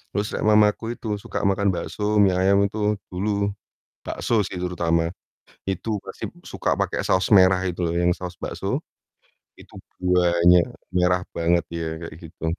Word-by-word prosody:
Terus 105 0 -1
nek - - -3
mamaku 105 +2 +3
itu 105 -3 -4
suka - - -5
makan 100 0 +2
bakso, 105 +4 -2
mie 95 - +4
ayam 100 +1 +4
itu 105 +1 0 0.2
dulu 100 +2 -1 0.5
bakso 115 -3 0
sih 95 -2 -5
terutama, 85 -2 0 0.6
itu 100 +3 -2
pasti - - -6 0.2
suka - - 0
pakai - - -1
saus 95 +3 +1
merah 95 -2 +6
itu 90 -1 -3
loh, 85 - -2
yang 85 0 +3
saus 90 0 -5
bakso, - - -4 0.9
itu - - -16 0.3
banyak, 90 -1 +4 0.3
merah 90 0 +3 0.2
banget 85 +1 +2
ya, 85 - -3 0.2
kayak 85 -2 -8
gitu. 80 +1 -12
95 Hz, 155 wpm, -23 LUFS, 90-105 Hz, 0.9 s, merah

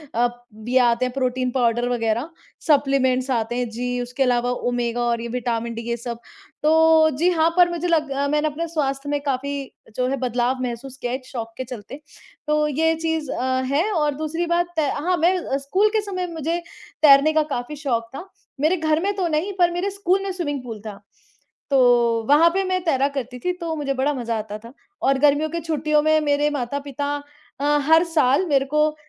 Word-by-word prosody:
अ, 240 +1 +3 0.4
ये 255 +2 +2
आते 240 0 +3
हैं 250 - -3
प्रोटीन 255 -1 -1
पाउडर 240 -1 +1
वग़ैरह, 235 +3 -1 0.4
सप्लीमेंट्स 270 -3 +2
आते 235 -1 -1
हैं, 245 -1 -1
जी 245 +2 -3
उसके 250 +2 -1
अलावा 245 -1 +1 0.2
ओमेगा 240 -1 -1
और 235 -1 0
ये 235 - -4
विटामिन 235 -1 -2
डी, 230 - -5
ये 235 - -1
सब। 235 0 -6 0.4
तो, 320 0 +5
जी 345 +4 +3
हाँ, 325 -1 +3
पर 355 -1 +6
मुझे 345 0 -2
लग 315 -4 +1
अ, 280 +1 0
मैंने 300 +1 +1
अपने 315 +3 -3
स्वास्थ्य 285 -3 -2
में 290 0 0
काफ़ी 280 0 -3 0.3
जो 250 0 +1
है 275 - -1
बदलाव 250 0 -1
महसूस 250 +2 -5
किया 245 -2 -4
है 255 - -1
एक 260 - -19
शौक 230 -3 -6
के 260 - -3
चलते, 250 +3 -9 0.5
तो 300 0 +2
ये 320 +3 +1
चीज़ 320 -2 -2
अ, 260 0 -1
है 320 +9 +1
और 300 -6 +1
दूसरी 315 +3 -2
बात 350 0 -1
हाँ, 310 +4 0
मैं 340 -4 +1
स्कूल 370 +10 +2
के - - +2
समय 370 -3 -4
मुझे 325 +2 -2 0.4
तैरने 295 +1 +6
का 310 0 +3
काफ़ी 245 +5 -4
शौक 240 -6 -2
था। 355 - -7 0.3
मेरे 320 +5 +3
घर 310 -1 +1
में 405 +1 0
तो 375 -3 0
नहीं, 330 +5 -1
पर 350 -1 +4
मेरे 355 +3 -1
स्कूल 390 -1 0
में 390 - -3
स्विमिंग 290 -7 -3
पूल 225 -3 -7
था, 200 -2 -8 0.7
तो 240 -3 +4
वहाँ 310 +4 +6
पे 390 - +2
मैं 370 -1 -1
तैरा 275 -4 +2
करती 250 -1 -5
थी 360 +8 -1
तो 330 -1 -2
मुझे 285 -3 -2
बड़ा 270 +2 0
मज़ा 235 -3 -2
आता 210 0 -6
था 235 - -12 0.3
और 270 0 +3
गर्मियों 295 +2 +3
की 335 +2 -3
छुट्टियों 305 -1 +1
में 310 0 +4
मेरे 290 0 +1
माता-पिता 285 +1 -3 0.5
अ, 295 +1 +3
हर 320 +2 +6
साल 300 -1 +2
मेरे 275 -2 +3
को 300 +2 +1
280 Hz, 200 wpm, -22 LUFS, 250-320 Hz, 0.7 s, पर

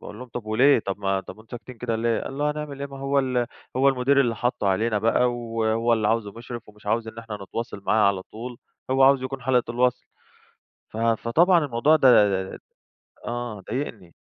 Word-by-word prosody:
باقول 105 +1 -10
لهم: 125 0 -9
"طب 120 -2 -7
وليه؟ 125 +5 +4
طب 100 -2 -4
ما 95 -1 0
طب 95 - -11
وأنتم 110 0 -18
ساكتين 125 +2 -11
كده 115 -1 -2
ليه؟" 115 0 0
قال 135 - -6
له: 150 0 +1
"هنعمل 150 -2 -6
إيه؟ 140 - -3
ما 135 0 -10
هو 135 +1 0
ال 125 -3 0 0.3
هو 135 +2 +4
المدير 135 +1 +3
اللي 120 -4 +1
حطُّه 120 -5 -1
علينا 110 +3 +1
بقى 120 +3 +2
و - - -5 0.2
وهو 115 +1 +1
اللي 110 -2 +2
عاوزه 110 -3 0
مُشرف، 120 0 -9
ومش 105 0 -18
عاوز 110 +2 0
إن 110 +1 -10
إحنا 110 -2 -6
نتواصل 105 0 -6
معاه 110 -2 +4
على 95 -2 -1
طول 120 +5 -9 0.3
هو 135 0 +3
عاوز 135 0 +5
يكون 130 0 -5
حلقة 125 -2 +1
الوصل." 125 +1 0 0.8
ف - - -11
فطبعًا 115 - +3
الموضوع 140 +4 +3
ده 135 -3 +5 1.1
آه. 120 -3 -4
ضايقني. 110 -8 -5
120 Hz, 200 wpm, -24 LUFS, 110-130 Hz, 1.1 s, عاوز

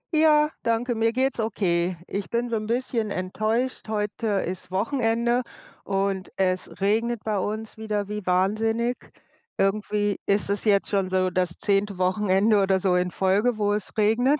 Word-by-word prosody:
Ja, 305 -1 +5 0.2
danke. 230 +2 +1
Mir 225 0 +2
geht's 260 +1 0
okay. 180 -5 0
Ich 200 0 -4
bin 235 +1 0
so 235 - -2
'n 215 -1 -3
bisschen 235 -2 -1
enttäuscht, 215 +7 -2
heute 215 +1 -2 0.2
ist 180 0 -6
Wochenende 235 +4 +1 0.4
und 195 -1 -1
es 185 -1 0
regnet 225 +3 +1
bei 210 -2 0
uns 215 +3 -4
wieder 210 -2 -2
wie 210 0 -4
wahnsinnig. 220 +6 +1 0.6
Irgendwie 205 0 0
ist 200 0 +1
es 200 - -2
jetzt 200 -2 +3
schon 195 -2 0
so 185 0 +1
das 180 -1 -1
10. 200 -1 0
Wochenende 195 +3 +3
oder 190 -1 +2
so 185 -1 +2
in 180 0 +1
Folge, 200 +6 +1
wo 205 -1 +1
es 205 -2 -3
regnet. 245 +7 +3
210 Hz, 160 wpm, -25 LUFS, 190-225 Hz, 0.6 s, Ja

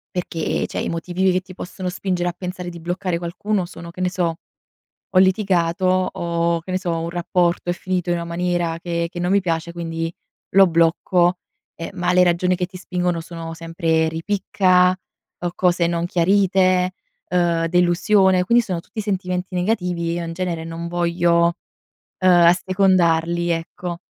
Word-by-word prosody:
perché, 170 -3 -2
cioè, - - -4
i - - -2
motivi 180 +3 0
che 185 0 +1
ti 185 0 -13
possono 180 +1 -6
spingere 180 -1 -2
a 175 - -7
pensare 180 -1 -5
di 170 -1 -9
bloccare 175 +1 -2
qualcuno 185 +3 -2
sono 170 -1 -10
che 180 - -8
ne 180 - +1
so, 175 -3 -1 0.8
ho 185 - +4
litigato, 185 -2 +2 0.3
o 170 0 -1
che 180 - -10
ne 185 - +1
so, 175 -2 -2
un 165 +1 -3
rapporto 175 0 0
è - - +2
finito 180 0 -2
in 175 - +2
una 170 - -4
maniera 170 -1 -1
che 170 -1 -2
che 175 - -6
non 175 +1 0
mi 200 - +4
piace, 170 -2 -2
quindi 165 -1 -4 0.4
lo 195 0 +8
blocco; 175 +1 +2 0.4
ehm, 165 - -6
ma 180 -1 0
le 180 0 +5
ragioni 180 +1 +2
che 180 0 -1
ti 185 +1 -12
spingono 180 -2 -2
sono 165 0 -7
sempre 165 -1 0
ripicca, 185 +1 +2 0.5
o 175 -1 -2
cose 175 -2 +2
non 170 0 -1
chiarite, 185 0 +2 0.4
ehm, 170 -2 +1
delusione; 180 +2 +3
quindi 235 +4 +4
sono 180 -4 -3
tutti 215 - -7
sentimenti 185 -2 -3
negativi, 180 -3 -1
io 170 0 -3
in 165 - -5
genere 170 -1 -3
non 165 +1 -6
voglio, 170 0 +2 0.7
ehm, 185 - +4 0.2
assecondarli, 175 -2 +2
ecco. 170 +1 -4
175 Hz, 165 wpm, -21 LUFS, 170-185 Hz, 0.8 s, lo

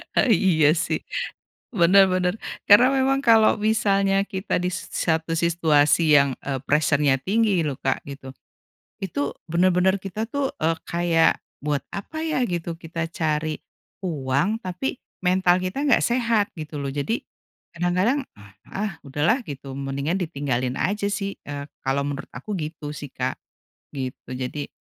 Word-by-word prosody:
E 260 - +3
iya 170 -6 +4
sih, - - -1 0.7
bener 195 -1 +6
bener 185 +1 +1 0.3
karena 245 +6 +7
memang 270 +1 +2
kalau 225 -2 +6
misalnya 200 -2 +2
kita 190 -1 -2
di 180 - -1
s 180 - -5
satu 160 0 0
situasi 160 -2 +4
yang, 140 -2 +1
eee, 135 -2 -2
pressure-nya 145 -2 +3
tinggi 205 -3 +2
loh, 145 -4 -3
Kak, 135 - -1
gitu, 135 -2 -9 0.7
itu 145 -6 -2 0.2
bener-bener 185 +2 +3
kita 195 +3 -4
tuh, 280 -1 0 0.2
eee, 165 +1 +2
kayak 170 -1 +2 0.2
buat 145 -1 -1
apa 315 +11 -5
ya 315 -4 0
gitu 170 -2 -4
kita 165 0 -4
cari 155 -1 -1 0.4
uang 165 - -1
tapi 185 +10 -3 0.3
mental 180 0 +3
kita 185 +10 -2
nggak 280 -5 +4
sehat 230 -4 +2
gitu 155 -2 -6
loh 140 - -3
jadi, 145 - -1 0.6
kadang-kadang, 185 - +1 0.2
ah 100 -1 -16 0.2
ah, 210 +1 -2
udah 145 +1 -3
lah 225 - +4
gitu 135 - -8
mendingan 140 +4 -2
ditinggalin 130 -5 -2
aja 200 +2 0
sih, 200 -1 -3
eee, 145 -1 -6 0.2
kalau 140 +2 0
menurut 140 -1 -5
aku 200 +12 -6
gitu 150 -3 -5
sih, 145 -2 -8
Kak, - - -2 0.6
gitu, 130 -1 -5
jadi 130 +3 -4
170 Hz, 145 wpm, -24 LUFS, 145-200 Hz, 0.7 s, karena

